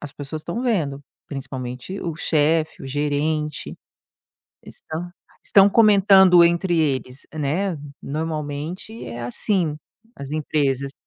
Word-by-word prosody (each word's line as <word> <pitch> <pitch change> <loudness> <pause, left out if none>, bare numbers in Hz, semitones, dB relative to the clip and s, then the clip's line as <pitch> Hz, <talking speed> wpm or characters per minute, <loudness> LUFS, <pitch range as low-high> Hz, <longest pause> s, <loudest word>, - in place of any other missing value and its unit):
as 145 -1 -8
pessoas 145 +2 -5
estão 225 +11 -4
vendo, 160 - 0 0.3
principalmente 130 +5 -6
o 165 - -3
chefe, 160 0 +1
o - - -6
gerente, 150 +1 -2 0.9
estão 170 +3 -7 0.3
estão 200 0 +6
comentando 195 -5 +6
entre 170 0 +2
eles, 135 -3 -2
né, 160 +5 -1 0.3
normalmente 155 +7 -4
é 120 0 -6
assim 160 - 0 0.4
as 140 0 -8
empresas. 140 -3 0
155 Hz, 110 wpm, -22 LUFS, 140-180 Hz, 0.9 s, estão